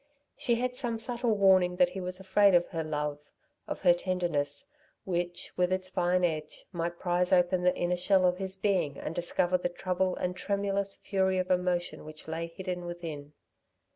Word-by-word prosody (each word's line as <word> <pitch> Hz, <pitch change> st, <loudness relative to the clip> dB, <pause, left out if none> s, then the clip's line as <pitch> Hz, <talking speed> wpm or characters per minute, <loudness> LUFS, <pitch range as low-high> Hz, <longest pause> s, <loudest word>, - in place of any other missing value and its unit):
She 235 Hz, -, +1 dB
had 250 Hz, +1 st, -1 dB
some 240 Hz, -3 st, -2 dB
subtle 235 Hz, -1 st, 0 dB
warning 185 Hz, -2 st, +5 dB
that 180 Hz, 0 st, +3 dB
he 190 Hz, -, -5 dB
was 180 Hz, +1 st, -1 dB
afraid 190 Hz, 0 st, +4 dB
of 175 Hz, 0 st, +3 dB
her 165 Hz, -2 st, -3 dB
love, 150 Hz, -1 st, -2 dB, 0.5 s
of -, -, -5 dB
her 180 Hz, -2 st, +6 dB
tenderness, 170 Hz, -6 st, -2 dB, 0.3 s
which, 175 Hz, -1 st, -3 dB
with 180 Hz, 0 st, +2 dB
its 185 Hz, 0 st, -1 dB
fine 180 Hz, 0 st, +1 dB
edge, 155 Hz, -3 st, -2 dB
might 170 Hz, -1 st, -3 dB
prize 180 Hz, 0 st, 0 dB
open 180 Hz, 0 st, +3 dB
the 180 Hz, 0 st, +3 dB
inner 175 Hz, 0 st, 0 dB
shell 185 Hz, +1 st, +3 dB
of 180 Hz, 0 st, +2 dB
his 190 Hz, 0 st, -2 dB
being 190 Hz, -7 st, 0 dB
and -, -, -5 dB
discover 175 Hz, +1 st, +1 dB
the 175 Hz, -, -1 dB
trouble 185 Hz, +1 st, -1 dB
and 180 Hz, 0 st, -2 dB
tremulous 200 Hz, 0 st, -1 dB
fury 190 Hz, -1 st, 0 dB
of 185 Hz, 0 st, -1 dB
emotion 180 Hz, -1 st, 0 dB
which 155 Hz, 0 st, -9 dB
lay 165 Hz, +1 st, -3 dB
hidden 180 Hz, +1 st, -5 dB
within. 160 Hz, -4 st, -7 dB
180 Hz, 180 wpm, -30 LUFS, 175-190 Hz, 0.5 s, her